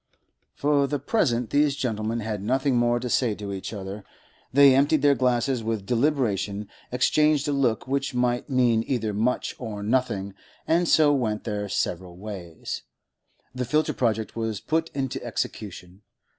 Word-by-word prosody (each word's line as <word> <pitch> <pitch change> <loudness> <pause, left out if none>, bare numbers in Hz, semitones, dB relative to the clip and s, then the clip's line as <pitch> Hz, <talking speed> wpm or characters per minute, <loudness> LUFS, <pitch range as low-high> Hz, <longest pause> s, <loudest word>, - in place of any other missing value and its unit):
For 145 -1 +2
the 145 - -1
present 125 - 0
these 145 -1 +3
gentlemen 115 -3 -2
had 105 -2 -3
nothing 130 +5 +1
more 120 0 +2
to 125 - -4
say 120 -2 +1
to 100 -1 -6
each 95 - -5
other; 100 -1 -6 0.5
they 140 0 +7
emptied 145 +2 +3
their 145 -1 +6
glasses 125 -1 +1
with 110 -3 -2
deliberation, 115 -6 0 0.2
exchanged 150 +4 +3
a - - +1
look 130 -6 0
which 140 0 -1
might 125 +2 0
mean 120 -4 +3
either 110 -5 -1
much 115 +5 0
or 105 -4 -5
nothing, 105 -4 0 0.3
and 170 +2 +2
so 150 -2 +5
went 110 -6 -1
their 105 -2 -3
several 90 -1 -2
ways. 95 -5 -6 0.7
The 125 0 -2
filter 150 +6 +1
project 110 -3 -1
was 110 -3 -2
put 160 +6 -1
into 135 -2 -3
execution. 90 -2 -5
120 Hz, 155 wpm, -25 LUFS, 105-140 Hz, 0.7 s, they